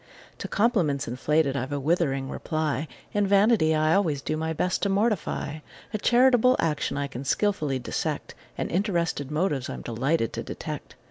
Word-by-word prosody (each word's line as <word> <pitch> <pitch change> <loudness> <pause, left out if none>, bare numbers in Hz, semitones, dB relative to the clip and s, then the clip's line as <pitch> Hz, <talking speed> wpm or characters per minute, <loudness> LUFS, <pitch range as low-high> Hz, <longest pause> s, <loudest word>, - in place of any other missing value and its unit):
To - - -4
compliments 185 - +1
inflated 140 +4 +1
I've 130 +1 -3
a 145 - -1
withering 140 -3 0
reply; 155 +1 -2 0.3
And 205 -1 +2
vanity 200 -5 +4
I 155 +1 +3
always 160 -8 +1
do - - -1
my 160 +1 -2
best 180 +3 -1
to 200 - +1
mortify; 195 -7 0 0.3
A 215 - -1
charitable 250 +2 +5
action 150 -3 -1
I 140 - 0
can 135 -1 -7
skilfully 150 -5 0
dissect: 125 - -3 0.2
And - - -3
interested 170 - 0
motives 150 -4 -1
I'm - - -6
delighted 120 +1 0
to - - -3
detect. - - -7
155 Hz, 160 wpm, -26 LUFS, 140-200 Hz, 0.3 s, charitable